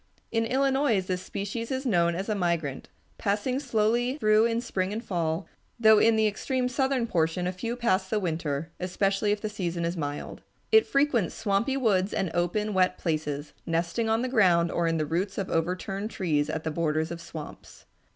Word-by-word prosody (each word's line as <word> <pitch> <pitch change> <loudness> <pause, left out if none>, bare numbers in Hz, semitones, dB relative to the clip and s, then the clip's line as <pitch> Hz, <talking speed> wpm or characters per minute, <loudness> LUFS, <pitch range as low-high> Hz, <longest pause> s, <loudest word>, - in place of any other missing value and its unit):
In 225 0 +1
Illinois 270 -2 +2
this 185 -1 -3
species 205 +5 -4
is 265 +1 -2
known 170 -7 +2
as 190 +3 -3
a 215 - +1
migrant, 170 -8 -2 0.3
passing 210 +6 0
slowly 240 0 +1
through 215 -4 +4
in 230 0 0
spring 195 -5 -2
and 225 +3 -4
fall, 170 -1 -1 0.3
though 220 -2 +7
in 225 +1 +5
the 220 0 +3
extreme 250 +4 0
southern 265 -1 0
portion 170 -3 0
a 180 - 0
few 230 +6 -4
pass 190 -6 +1
the 215 - +1
winter, 160 -3 -2
especially 195 +3 0
if 205 0 -1
the 215 - -2
season 175 -5 -3
be 170 - -2
mild. 145 -1 -5 0.3
It 440 0 +6
frequents 275 - +1
swampy 225 +5 0
woods 200 -6 +1
and 185 -4 -1
open, 205 +5 0
wet 185 -1 +2
places, 150 -3 -3
nesting 170 +7 0
on 225 +2 +2
the - - 0
ground 180 -9 +3
or 170 -1 0
in 165 0 +1
the 155 - 0
roots 180 +6 -2
of 195 - -3
overturned 185 +5 -1
trees 155 -9 0
at 160 - -3
the 160 - -2
borders 160 0 0
of 170 0 -6
swamps. 160 -3 -10
195 Hz, 190 wpm, -27 LUFS, 170-230 Hz, 0.3 s, though